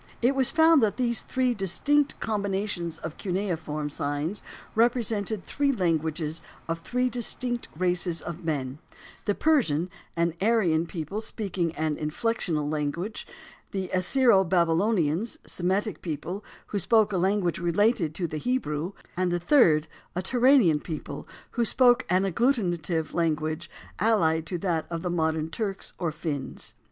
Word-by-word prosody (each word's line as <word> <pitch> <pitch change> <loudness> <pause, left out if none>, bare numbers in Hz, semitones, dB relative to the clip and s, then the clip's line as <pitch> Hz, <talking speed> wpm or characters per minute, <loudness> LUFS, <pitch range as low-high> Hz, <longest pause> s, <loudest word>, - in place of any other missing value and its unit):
It 245 +3 +3
was 265 -2 +3
found 320 -2 +5
that 215 -1 +1
these 240 -2 +1
three 255 -1 0
distinct 280 - +1
combinations 200 -5 -2
of 160 -1 -7
cuneiform 165 -6 -2
signs 145 +7 -3 0.3
represented 225 -3 +1
three 285 -1 +1
languages 160 - -1 0.3
of 165 0 -2
three 250 +9 0
distinct 245 0 -2
races 175 -1 +1
of 170 +1 -7
men, 140 -4 -2 0.5
the 205 - +1
Persian, 185 - +2 0.2
an 170 -1 +1
Aryan 185 -7 +2
people 170 +5 -4
speaking 190 -6 -2
an 155 -1 -1
inflectional 155 -1 -1
language; 155 +7 -3 0.4
the 190 -2 -3
Assyro 195 +2 +4
Babylonians, 175 +2 +1
Semitic 190 +4 -1
people 175 +5 -4 0.3
who 205 - -1
spoke 215 +3 +4
a - - +1
language 185 -1 +1
related 175 -1 +2
to 180 - -1
the 155 -2 -4
Hebrew, 175 - -2 0.2
and 180 0 0
the 175 - 0
third 170 - +4 0.3
a 180 - -1
Turanian 245 - +4
people 160 -3 -6 0.2
who 240 - 0
spoke 245 +1 +5
an 185 +2 +3
agglutinative 175 - 0
language, 155 -1 -1 0.3
allied 165 -7 +2
to 180 - -2
that 170 -3 -1
of 165 -1 -4
the 180 - -1
modern 160 -1 0
Turks 195 0 -3
or 170 -3 -1
Finns. 145 -7 -4
180 Hz, 140 wpm, -27 LUFS, 160-220 Hz, 0.5 s, found